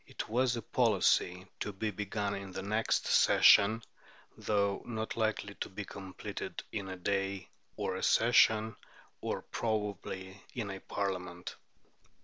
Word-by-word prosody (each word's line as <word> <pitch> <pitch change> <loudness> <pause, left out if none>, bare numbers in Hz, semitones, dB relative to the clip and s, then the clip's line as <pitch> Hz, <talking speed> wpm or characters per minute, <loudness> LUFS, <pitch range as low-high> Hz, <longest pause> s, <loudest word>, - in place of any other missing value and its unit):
It - - -5
was 125 +2 +2
a 115 - -4
policy 95 -5 +2
to 105 - -2
be 105 +3 -2
begun 100 0 -2
"in 100 -1 -6
the 95 - -4
next 110 +3 +1
session," 110 +3 +6 0.5
though 100 -2 0
not 110 -2 -4
likely 110 -2 -1
to - - -3
be 100 +1 -6
completed 95 -1 -7
"in 100 -3 -4
a 95 - -5
day, 95 +1 -1 0.3
or - - -2
a - - -4
session, 110 -1 +4 0.5
or - - -3
probably 100 -3 -3
in 110 -5 -3
a 95 - -6
Parliament." 90 -3 -4
100 Hz, 135 wpm, -32 LUFS, 95-110 Hz, 0.5 s, session